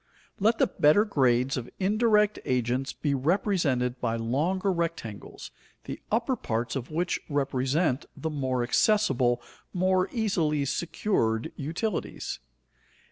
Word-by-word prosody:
Let 220 +3 +3
the - - +4
better 185 +4 +4
grades 130 - +2
of 120 - -5
indirect 210 +1 +3
agents 125 +1 0
be 145 -2 -2
represented 140 - +1
by 115 -2 0
longer 155 - 0
rectangles, 165 - -5 0.3
the - - -7
upper 235 +4 +1
parts 120 - -2
of 130 -2 -4
which 175 +3 -1
represent 140 +1 0
the 160 - -3
more 130 -4 -1
accessible, 130 - +2 0.3
more 185 +1 +2
easily 165 - 0
secured 135 - -1
utilities. 165 +8 -3
150 Hz, 115 wpm, -27 LUFS, 125-190 Hz, 0.3 s, the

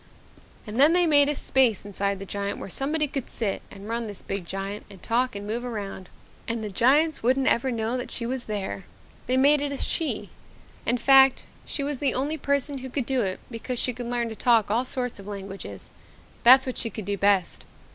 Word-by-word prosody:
"And 220 +2 -5
then 295 +4 +6
they 355 0 +5
made 290 -3 +5
a 295 - 0
space 255 -7 +2
inside 200 0 -2
the 195 - -8
giant 200 +1 -3
where 195 - -7
somebody 300 - 0
could 275 -2 -5
sit 210 -4 -2
and 200 +1 -11
run 230 0 -2
this 205 -2 -8
big 195 -3 -4
giant 195 +2 -4
and 195 - -12
talk 250 +1 0
and 200 0 -6
move 230 +3 -3
around 205 -6 -6 0.4
and 230 -1 -2
the 210 - -4
giants 285 - +3
wouldn't 260 +3 +2
ever 260 +1 +2
know 230 0 -1
that 250 - -5
she 235 - -4
was 250 0 -3
there. 200 -2 -4 0.4
They 255 +1 +2
made 285 +2 +5
it 290 -1 -2
a 280 - -3
she. 320 +3 -2 0.6
In 245 - +2
fact, 270 +2 +6 0.2
she 285 - -2
was 285 -2 -3
the 275 -3 +1
only 290 +5 -1
person 280 0 0
who 260 0 -7
could 260 -1 -2
do 260 -1 +1
it 190 -3 -2
because 245 +2 -4
she 250 - 0
could 240 0 -6
learn 240 -1 -1
to 220 - -7
talk 225 -3 +3
all 240 +4 +1
sorts 250 -4 -3
of 200 - -11
languages 195 -1 -8 0.5
that's 260 +2 +8
what 255 - -3
she 230 - 0
could 215 -1 -7
do 200 +1 -1
best. 200 -2 +2
240 Hz, 215 wpm, -25 LUFS, 205-270 Hz, 0.6 s, that's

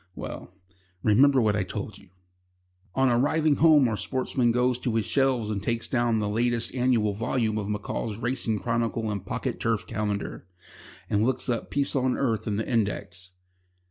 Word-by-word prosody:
"Well, - - -7 0.5
remember 130 +6 +5
what 105 -2 +2
I 105 - +1
told 100 +3 -5
you...." 100 - -20 0.9
On 135 0 +3
arriving 145 +5 +2
home 155 -4 +6
our 115 - -1
sportsman 125 0 0
goes 125 +1 +1
to 120 -3 -2
his 110 -2 +1
shelves 130 -6 +1
and 100 -2 -2
takes 115 +3 -2
down 120 -2 +1
the 105 -1 -1
last 115 +2 0
annual 120 -5 +2
volume 110 0 -1
of 100 -1 -4
M'Call's 105 +1 -3
Racing 120 -2 -1
Chronicle 115 0 -1
and 100 -3 -4
Pocket 95 - -3
Turf - - 0
Calendar, 105 -3 -4 0.6
and 105 +1 +1
looks 130 +2 0
up 115 -2 -1
Peace 140 0 0
on 130 -1 +1
Earth 115 -6 -1
in 105 - 0
the 110 - -2
index. 95 -5 -2
115 Hz, 170 wpm, -26 LUFS, 105-130 Hz, 0.9 s, home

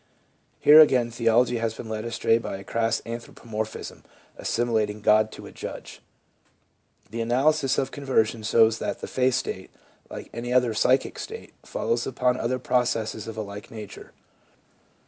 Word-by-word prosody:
Here 150 +1 +8
again 125 -6 +5
theology 115 +1 +2
has 115 -1 -2
been - - -8
led 110 0 -4
astray 115 0 +1
by 105 - -5
a 100 - -10
crass 115 +3 -1
anthropomorphism, 115 -2 -6 0.3
assimilating 110 -3 -1
God 110 +1 +4
to - - -10
a - - -10
Judge. - - -8 1.1
The 115 +1 -3
analysis 135 +4 +2
of 135 - -1
conversion 120 -5 0
shows 110 +1 +3
that - - -4
the - - -5
faith 130 -1 +1
state, 95 -6 -4 0.4
like - - -9
any 120 +1 -5
other 125 -2 +3
psychic 130 +5 +1
state, - - -8
follows 120 +1 -2
upon 125 0 0
other 125 +2 -1
processes 120 -4 -1
of 110 -1 -7
a - - -2
like 100 0 -9
nature. 105 -3 -10
115 Hz, 150 wpm, -25 LUFS, 110-125 Hz, 1.1 s, Here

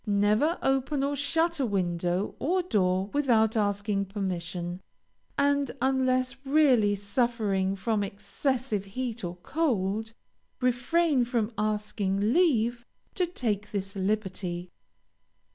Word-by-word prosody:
Never 210 - +2
open 270 +1 +1
or 285 +1 0
shut 325 +4 +1
a 270 - +2
window 180 -1 -1
or 360 +5 +1
door 190 - +1
without 235 -6 +3
asking 205 -1 0
permission, 180 -2 -4 0.6
and 280 0 +2
unless 260 0 +1
really 270 -8 +4
suffering 200 -2 0
from 205 +2 0
excessive 210 +3 -2
heat 235 +2 -4
or 175 0 -4
cold, 225 - -1 0.5
refrain 255 +3 +2
from 235 -2 -1
asking 210 0 0
leave 240 -9 +2 0.3
to 360 -2 0
take 210 - -2
this 195 -1 -4
liberty. 185 -3 -2
220 Hz, 110 wpm, -28 LUFS, 195-265 Hz, 0.6 s, really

